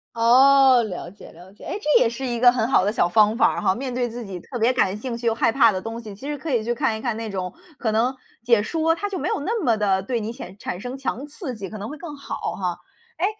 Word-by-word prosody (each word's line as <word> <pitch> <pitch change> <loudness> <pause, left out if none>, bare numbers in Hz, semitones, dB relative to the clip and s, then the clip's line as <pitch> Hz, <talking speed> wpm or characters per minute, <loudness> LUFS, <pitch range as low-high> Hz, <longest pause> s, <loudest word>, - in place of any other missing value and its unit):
哦， 260 +2 +6
了 180 -4 -6
解 200 - -14
了 180 +4 -15
解。 - - -17
哎， - - -4
这 300 -6 +3
也 230 - +4
是 260 +3 -5
一 240 -2 -2
个 245 0 +7
很 235 -2 0
好 250 - +3
的 205 - +1
小 195 - +2
方 215 +3 +3
法 - - +2
哈， 190 - +2
面 255 -1 -4
对 245 -1 -1
自 235 0 -7
己 185 -2 -7
特 245 - -7
别 235 +3 +3
感 205 -5 +1
兴 235 +1 -5
趣 235 0 -3
又 225 - +2
害 230 - +2
怕 230 -3 +5
的 185 - -3
东 225 +2 -6
西 210 -3 -9
其 270 +8 -9
实 295 -1 -3
可 300 +2 -5
以 230 -3 +1
去 240 +1 -1
看 235 -4 0
一 - - -9
看 235 -4 -1
那 225 -1 -5
种， 185 -2 -4 0.2
可 220 -3 -1
能 240 +4 +1 0.3
解 235 -3 +3
说 325 +4 +1
它 410 +4 -3
就 375 -4 -4
没 - - -2
有 - - -1
那 450 +8 -1
么 230 -4 +2
得 195 -2 +1
对 235 +4 -2
你 220 +1 -4
显 195 -6 -10
产 180 - -5
生 250 +2 -6
强 270 +1 -4
刺 290 -3 -6
激 200 -4 -7
可 215 - -8
能 205 +3 -6
会 300 - -7
更 320 -3 -8
好 280 - -6 0.2
哈。 180 -4 -3 0.4
诶， 370 - +1
235 Hz, 310 characters per minute, -23 LUFS, 210-265 Hz, 0.4 s, 个